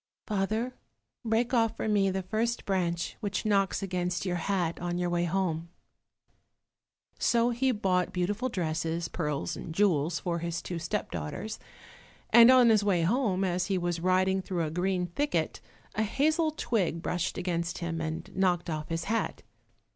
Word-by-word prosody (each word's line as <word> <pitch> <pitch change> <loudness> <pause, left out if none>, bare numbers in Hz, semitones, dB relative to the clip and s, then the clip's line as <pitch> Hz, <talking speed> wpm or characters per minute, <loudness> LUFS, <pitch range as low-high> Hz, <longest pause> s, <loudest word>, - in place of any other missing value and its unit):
"Father, 215 +5 -1 0.5
break 230 +2 +1
off 225 -2 +2
for - - -2
me 200 -2 +3
the 190 0 -2
first 225 +5 -1
branch 175 -3 -1
which 200 -3 -2
knocks 200 -2 +2
against 180 -1 -2
your 180 -1 0
hat 175 -3 -1
on 175 0 -2
your 175 0 -1
way 175 0 +1
home." 170 -2 -1 1.5
So 235 0 +3
he 260 +2 +1
bought 185 -5 +1
beautiful 205 +8 -1
dresses, 165 -2 -2
pearls 150 -5 -2
and 160 - -7
jewels 170 -5 +2
for 170 -2 -2
his 170 0 -3
two 175 -2 -4
step 165 - -3
daughters, 85 - -5 0.7
and 235 0 +9
on 255 -2 +7
his 215 -2 +4
way 185 -5 +2
home, 195 -1 +1
as 180 -1 0
he 195 -2 +1
was 175 -1 -1
riding 185 +2 +2
through 180 -2 -2
a 155 - -2
green 180 +1 0
thicket, 285 - -1 0.3
a - - -1
hazel 310 +9 +2
twig 195 - -1
brushed 175 0 -1
against 170 -1 -2
him 165 -1 -3
and 160 0 -5
knocked 175 -2 +1
off 155 -1 -4
his 165 0 -2
hat. 225 +4 -2
185 Hz, 160 wpm, -29 LUFS, 170-215 Hz, 1.5 s, and